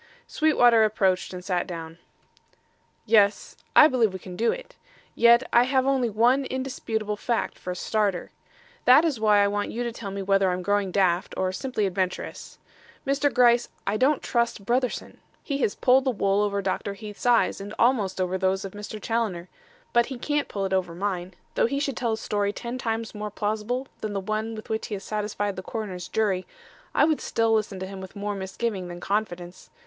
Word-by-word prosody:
Sweetwater 245 -7 +4
approached 195 -4 +1
and 180 -1 -8
sat 180 -3 -1
down. 165 -1 -7 1.1
"Yes; 205 -2 +3 0.2
I 300 - +9
believe 235 -8 +2
we - - -4
can 180 -1 -10
do 230 +5 +2
it; - - -8 0.4
yet 235 +2 +5
I 235 - +7
have 260 0 +2
only 265 -3 +2
one 240 +6 +3
indisputable 230 -5 -3
fact 235 +2 -2
for - - -7
a 180 - -2
starter. 200 -1 -1 0.5
That 265 +6 +7
is 290 -8 0
why 210 -2 +4
I - - +3
want 205 0 -1
you 240 - -3
to 235 - -2
tell 225 -3 -7
me 195 0 -4
whether 195 0 +3
I'm 180 0 -2
growing 205 0 +1
daft 180 -2 +1
or 185 0 0
simply 220 +1 -2
adventurous. 185 -1 -3 0.5
Mr. 280 +1 +1
Gryce, 240 -1 +4 0.2
I 200 - 0
don't 265 +6 +2
trust 235 -4 -1
Brotherson. 250 +3 -1 0.2
He 280 -2 -2
has 210 - 0
pulled 260 +1 +4
the - - +3
wool 200 -3 +1
over 200 -1 0
Dr. 200 +1 -2
Heath's 210 +3 -7
eyes 235 -4 +3
and 200 +1 -7
almost 220 -7 +2
over 185 0 -1
those 190 +1 0
of 195 - -6
Mr. 210 +1 -7
Challoner. 210 -6 -2 0.4
But 235 0 +4
he 265 - -6
can't 295 +3 -1
pull 195 -1 -3
it 190 - -2
over 180 -3 0
mine. 185 -1 -3 0.2
Though - - +2
he 275 +3 -1
should 280 -3 -1
tell 235 -2 -1
a - - -2
story 205 -2 -1
ten 240 +4 -6
times 225 -1 -3
more 210 0 -5
plausible 215 +5 -2
than 215 -1 -4
the 200 - -1
one 215 +3 -3
with 215 - -9
which 220 0 -2
he 210 - -3
has 195 - -8
satisfied 205 -1 -2
the - - -3
coroner's 185 -4 -5
jury, 195 -4 0 0.5
I - - +5
would 310 -1 +1
still 225 0 +1
listen 215 -3 0
to - - -2
him 190 0 -8
with 190 +1 -10
more 205 0 -3
misgiving 190 0 -3
than 175 0 -8
confidence. 180 -3 -3
210 Hz, 200 wpm, -25 LUFS, 190-235 Hz, 1.1 s, I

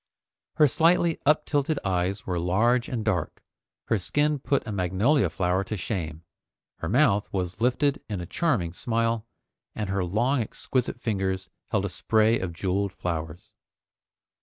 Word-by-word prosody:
Her 155 - +6
slightly 165 +4 +3
uptilted 150 0 +2
eyes 95 +1 0
were 90 -2 -1
large 115 +8 +2
and 115 -4 -3
dark, 90 -8 -1 0.5
her 110 - +2
skin 145 - +1
put 140 +1 0
a 110 - -4
magnolia 100 - +2
flower 90 0 0
to 105 +2 -4
shame, 85 -5 -4 0.6
her 80 - -3
mouth 110 -4 +3
was 90 +1 -3
lifted 130 +4 +2
in 100 -3 -3
a 90 - -5
charming 100 - 0
smile, 115 +2 -1 0.5
and 105 -3 -3
her 100 -1 0
long 120 +9 +1
exquisite 120 +2 -2
fingers 95 -4 -2 0.2
held - - +1
a - - -2
spray 110 +1 +2
of 95 -2 -3
jeweled 95 +3 -1
flowers. 85 -2 -5
105 Hz, 145 wpm, -26 LUFS, 90-125 Hz, 0.6 s, Her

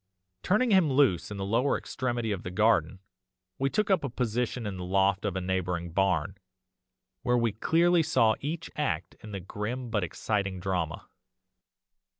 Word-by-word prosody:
Turning 220 +5 +2
him 185 -7 +4
loose 130 - +3
in 105 - -6
the 95 - -3
lower 115 +7 +2
extremity 120 -3 -3
of 95 -3 -2
the - - -5
garden, 95 -3 +2 0.6
we 135 +1 +1
took 210 +8 0
up 185 -5 +3
a 140 - -2
position 120 0 -2
in 100 -2 -4
the 90 - -5
loft 95 +2 +1
of 100 -3 -1
a 95 - -1
neighbouring 90 -2 -2
barn, 95 -1 +1 0.9
where 125 -2 +2
we 115 -2 +2
clearly 170 - +3
saw 115 -7 +3
each 160 +4 -4
act 90 - -2
in 105 - -9
the 100 - -4
grim 115 +6 -5
but 105 -4 +1
exciting 95 +1 -2
drama. 90 -4 -2
105 Hz, 165 wpm, -28 LUFS, 95-130 Hz, 0.9 s, him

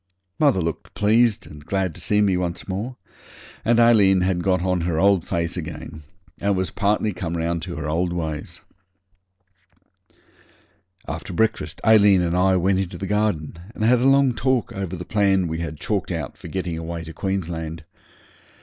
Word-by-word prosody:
Mother 140 -11 +3
looked 85 -1 -5
pleased 110 +1 +3
and 75 -1 -12
glad 95 0 -1
to - - -10
see 105 0 +2
me 95 -2 +2
once 90 -1 -3
more, 105 +7 -4 0.7
and 120 +1 +3
Aileen 105 -5 +5
had 90 -1 +1
got 90 -1 +1
on 90 -1 0
her 85 -1 -1
old 95 -1 +4
face 85 0 -2
again, 80 -1 -7 0.4
and 100 0 +1
was 95 0 -1
partly 105 +1 0
come 85 -1 -4
round 85 0 -1
to 90 0 -6
her 75 -1 -4
old 85 +3 0
ways. 80 -3 -4 2.5
After 95 - -5
breakfast 95 -5 -1
Aileen 105 -4 +6
and 85 0 0
I 95 +1 +3
went 95 +1 +2
into 95 -2 -3
the 95 - -5
garden 100 -6 -1 0.2
and 110 - -3
had 120 +2 +4
a 125 - +1
long 135 -2 +4
talk 130 -1 0
over 95 -2 -4
the 90 0 -7
plan 95 -2 +2
we 80 0 -3
had 80 -3 -5
chalked 105 -3 -2
out 80 -7 -4
for - - -11
getting 90 -3 -3
away 85 0 -5
to 80 0 -9
Queensland. 85 -4 -3
95 Hz, 175 wpm, -23 LUFS, 85-105 Hz, 2.5 s, Aileen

